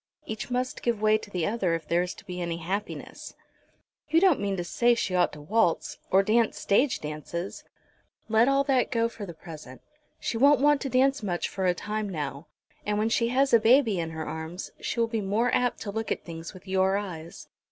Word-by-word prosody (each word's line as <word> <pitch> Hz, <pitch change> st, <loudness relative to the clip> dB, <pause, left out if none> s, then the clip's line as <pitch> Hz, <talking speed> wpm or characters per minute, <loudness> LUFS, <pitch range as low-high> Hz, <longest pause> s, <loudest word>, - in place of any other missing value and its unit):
"Each 220 Hz, +2 st, -5 dB
must 250 Hz, +1 st, -2 dB
give 235 Hz, -3 st, 0 dB
way 215 Hz, 0 st, +3 dB
to 215 Hz, -, -11 dB
the 180 Hz, -5 st, -1 dB
other 200 Hz, -6 st, 0 dB
if 160 Hz, -2 st, -6 dB
there 170 Hz, +1 st, +2 dB
is 180 Hz, 0 st, -3 dB
to -, -, -15 dB
be 180 Hz, -2 st, -5 dB
any 170 Hz, -1 st, -2 dB
happiness." 190 Hz, +5 st, -5 dB, 0.7 s
"You 320 Hz, +2 st, +5 dB
don't 370 Hz, -4 st, +4 dB
mean 200 Hz, -1 st, -1 dB
to 175 Hz, -, -2 dB
say 240 Hz, +7 st, +2 dB
she 195 Hz, -5 st, -2 dB
ought 180 Hz, -1 st, +3 dB
to 150 Hz, -, -9 dB
waltz, 175 Hz, +1 st, +1 dB
or 195 Hz, +1 st, +5 dB
dance 225 Hz, +2 st, +2 dB
stage 250 Hz, +7 st, +2 dB
dances?" 155 Hz, +4 st, -5 dB, 0.6 s
"Let 225 Hz, +2 st, +4 dB
all 275 Hz, 0 st, +3 dB
that 270 Hz, -3 st, +2 dB
go 230 Hz, -2 st, +1 dB
for 215 Hz, -3 st, -8 dB
the 170 Hz, -, -8 dB
present. 155 Hz, -6 st, -11 dB, 0.4 s
She 230 Hz, -, -2 dB
won't 280 Hz, +2 st, +6 dB
want 290 Hz, 0 st, +4 dB
to 275 Hz, -, -2 dB
dance 265 Hz, +1 st, +3 dB
much 180 Hz, -5 st, -2 dB
for 190 Hz, -1 st, -2 dB
a 180 Hz, -, +2 dB
time 210 Hz, +2 st, -3 dB
now, 150 Hz, -3 st, -5 dB, 0.4 s
and 210 Hz, 0 st, -1 dB
when 215 Hz, +1 st, +1 dB
she 230 Hz, +1 st, +2 dB
has 265 Hz, +2 st, +2 dB
a 230 Hz, -, +8 dB
baby 225 Hz, -3 st, +4 dB
in 165 Hz, -1 st, -2 dB
her 160 Hz, -1 st, -5 dB
arms 160 Hz, +3 st, -6 dB
she -, -, -3 dB
will 230 Hz, -, +4 dB
be 225 Hz, -1 st, -2 dB
more 210 Hz, +5 st, +1 dB
apt 250 Hz, -1 st, +1 dB
to 205 Hz, -, -4 dB
look 220 Hz, +1 st, -3 dB
at -, -, -2 dB
things 165 Hz, -1 st, -7 dB
with 185 Hz, +1 st, -15 dB
your 190 Hz, +1 st, +2 dB
eyes. 170 Hz, -5 st, -7 dB
205 Hz, 220 wpm, -27 LUFS, 175-235 Hz, 0.7 s, a